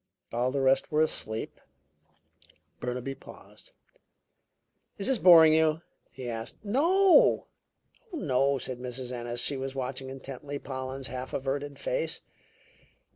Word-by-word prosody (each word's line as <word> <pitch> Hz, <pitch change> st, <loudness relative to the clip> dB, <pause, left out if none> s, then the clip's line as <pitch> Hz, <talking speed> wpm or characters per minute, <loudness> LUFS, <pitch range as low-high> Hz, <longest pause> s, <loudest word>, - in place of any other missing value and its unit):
All 120 Hz, +2 st, +1 dB
the 140 Hz, 0 st, -1 dB
rest 135 Hz, 0 st, +2 dB
were 155 Hz, +1 st, +4 dB
asleep." 110 Hz, -7 st, -3 dB, 1.2 s
Burnaby 125 Hz, +2 st, -3 dB
paused. 135 Hz, -, -15 dB, 1.3 s
"Is 200 Hz, -, -3 dB
this 265 Hz, -4 st, +2 dB
boring 165 Hz, -4 st, +8 dB
you?" 160 Hz, +1 st, +2 dB, 0.3 s
he 130 Hz, -2 st, -8 dB
asked. 115 Hz, -1 st, -5 dB
"Oh, 345 Hz, -, +4 dB, 0.7 s
no!" 140 Hz, -, +1 dB
said 125 Hz, -1 st, -5 dB
Mrs. 125 Hz, 0 st, -5 dB
Ennis; 120 Hz, -1 st, -4 dB
she 140 Hz, -, -1 dB
was 135 Hz, 0 st, -5 dB
watching 130 Hz, 0 st, -4 dB
intently 135 Hz, +1 st, -7 dB
Pollen's 130 Hz, -1 st, -6 dB
half 130 Hz, 0 st, -6 dB
averted 140 Hz, +2 st, -3 dB
face. -, -, -2 dB
135 Hz, 120 wpm, -28 LUFS, 125-155 Hz, 1.3 s, boring